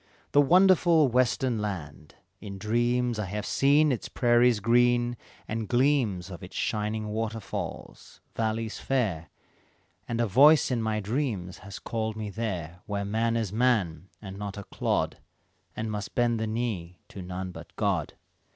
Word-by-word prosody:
"The 145 - +6
wonderful 170 -1 +5
western 125 -1 +1
land; 80 -8 -6 0.2
in 100 -2 -8
dreams 120 +3 0
I 105 - -1
have 105 +2 -4
seen 145 +2 +3
its 125 - -3
prairies 120 -2 +3
green, 120 +2 +3 0.3
and 110 0 -3
gleams 120 -8 +1
Of 85 - -8
its - - -10
shining 105 0 -2
waterfalls, 110 0 -5 0.2
valleys 110 0 -2
fair, 100 - -1 0.8
And 120 -1 -2
a 120 - +3
voice 140 +8 +6
in 120 -2 0
my 110 -1 -1
dreams 105 -6 -3
has 100 0 -9
called 110 -1 -3
me 110 -2 -5
there 90 -6 -4
Where 100 -1 -2
man 115 +3 0
is 110 -5 -2
a - - -7
man, 95 -9 +1
and 100 -1 -9
not 100 -1 -5
a 100 - -6
clod, - - -1 0.6
And 110 0 -3
must 105 -2 -5
bend 120 -2 +2
the 110 - -1
knee 110 -7 -3
to 95 - -8
none 90 +1 -5
but - - -12
God. - - -1
110 Hz, 155 wpm, -27 LUFS, 100-120 Hz, 0.8 s, The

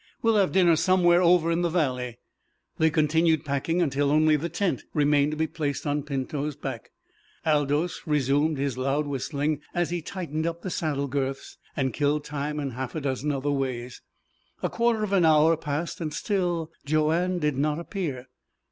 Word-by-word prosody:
We'll 225 -1 +4
have 195 -2 +3
dinner 175 -3 +5
somewhere 175 +1 +4
over 170 -2 +4
in 165 +1 +1
the 175 - +1
valley." 125 -8 -1 0.6
They 160 - +4
continued 160 0 +2
packing 150 +5 0
until 140 -2 +1
only 155 +1 +4
the 160 +3 -2
tent 185 +3 -1
remained 145 -1 +3
to 155 - -4
be 160 - +1
placed 150 -3 -3
on 145 0 0
Pinto's 140 +1 -3
back. - - -6 0.6
Aldous 150 +3 0
resumed 145 +1 +2
his 135 -2 -2
loud 135 +3 0
whistling 145 +2 -2
as 175 -1 0
he 175 -1 -2
tightened 160 -2 -3
up 170 0 -4
the 185 - -4
saddle 145 -4 -1
girths, 135 0 -3 0.2
and 130 -2 0
killed 145 0 +1
time 150 +1 -3
in 140 -2 -3
half 130 +3 -5
a 155 - -2
dozen 140 +1 -1
other 145 +1 -1
ways. 130 -3 -3 0.6
A - - 0
quarter 230 -2 +1
of 200 -2 -2
an 190 -3 +4
hour 160 +1 +5
passed. 155 +2 -4
Still 175 -4 -1
Joanne 155 +5 +1
did 150 -4 0
not 150 +2 0
appear. 165 -7 -4
150 Hz, 175 wpm, -26 LUFS, 140-170 Hz, 0.6 s, dinner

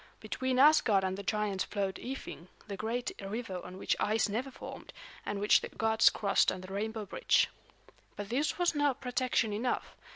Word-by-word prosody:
Between 255 +4 -2
Asgard 255 -8 +5
and 190 0 -1
the 200 - -6
giants 205 -1 -1
flowed 195 -2 -2
Ifing, 255 -9 -7 0.2
the 200 - -4
great 230 +4 -2
river 195 -2 -4
on 180 +1 -9
which - - 0
ice 220 +1 +2
never 235 +6 -2
formed, - - -10 0.3
and 205 - -2
which 205 +1 +5
the - - -6
gods 220 0 +4
crossed 200 -2 +2
on 185 - -6
the 185 +1 -9
rainbow 220 +1 -3
bridge. - - +2 0.7
But 205 -1 -6
this 275 +6 0
was 355 -1 +2
not 290 -3 +1
protection 250 -3 0
enough. 235 +4 -2
220 Hz, 175 wpm, -31 LUFS, 200-250 Hz, 0.7 s, Asgard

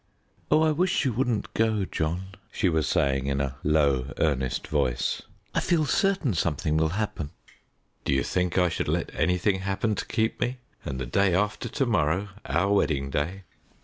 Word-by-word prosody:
"Oh, 155 +1 +5
I 160 - +4
wish 175 0 +1
you 130 - +1
wouldn't 120 -2 -1
go, 110 -3 +1
John," 90 +2 -2 0.2
she 95 - +1
was 80 -3 +1
saying 70 -1 +1
in 70 0 0
a 70 -1 -2
low, 70 -3 +2
earnest 65 -5 0
voice. - - 0 0.3
"I - - +2
feel 170 -4 +2
certain 185 - +2
something 80 -2 0
will 80 0 +2
happen." 100 -9 -2 0.7
"Do - - -1
you 70 0 +2
think 90 -1 -1
I 90 -1 +5
should 80 - -2
let - - -1
anything 90 +2 +1
happen 95 +3 -1
to 100 - -3
keep 110 0 0
me, 125 +1 0 0.3
and 65 -2 -4
the 65 - -2
day 95 +7 +2
after 105 +5 0
to 135 - 0
morrow 100 -3 +1 0.2
our 100 +4 +1
wedding 70 -8 +1
day?" 90 +8 -2
90 Hz, 180 wpm, -26 LUFS, 75-110 Hz, 0.7 s, Oh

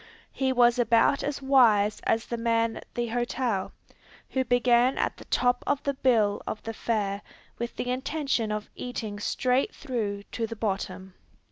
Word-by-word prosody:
He 265 -1 0
was 245 -1 +4
about 235 +4 +4
as 285 -1 -3
wise 225 -6 +4
as 225 0 +1
the 235 - -3
man 230 -1 +1
at - - -11
the 240 -1 -1
hotel, 240 -3 -1 0.6
who 260 - +1
began 245 +1 +3
at - - -1
the - - -12
top 245 0 +1
of 285 0 0
the 280 - 0
bill 230 -6 +2
of 215 - -4
fare 215 -3 -2 0.4
with 235 0 -4
the 250 - -2
intention 265 -3 -1
of 210 0 -4
eating 220 -4 -5
straight 255 +5 0
through 215 -7 -3
to 230 -1 -2
the 230 - -6
bottom! 195 -3 -3
235 Hz, 160 wpm, -27 LUFS, 215-255 Hz, 0.6 s, was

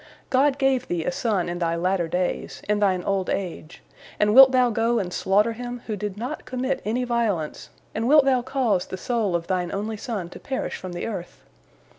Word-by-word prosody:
God 275 +1 +3
gave 270 -2 +1
thee 175 -2 -1
a - - 0
son 195 -2 0
in 175 0 -4
thy 170 -1 0
latter 180 0 0
days, 180 +2 -2
in 210 0 +1
thine 190 -3 +2
old 195 -2 -1
age, 170 -4 -4 0.4
and 210 0 +3
wilt 265 +2 +10
thou 250 -2 +3
go 230 +2 +1
and 180 -5 -2
slaughter 210 +4 +2
him, 245 +1 -6
who 215 - -3
did 205 -1 -5
not 240 +4 -5
commit 260 +1 -2
any 235 +4 -1
violence, 225 -10 -1 0.2
and 225 - -1
wilt 295 0 +6
thou 260 -2 +3
cause 240 -7 0
the 185 - -6
soul 220 -4 -1
of 170 -1 -1
thine 180 -1 -1
only 215 +2 -3
son 205 -5 -4
to - - -10
perish 265 -1 -3
from 185 -1 -7
the 175 - -4
earth? 185 -6 -6
210 Hz, 205 wpm, -24 LUFS, 180-245 Hz, 0.4 s, wilt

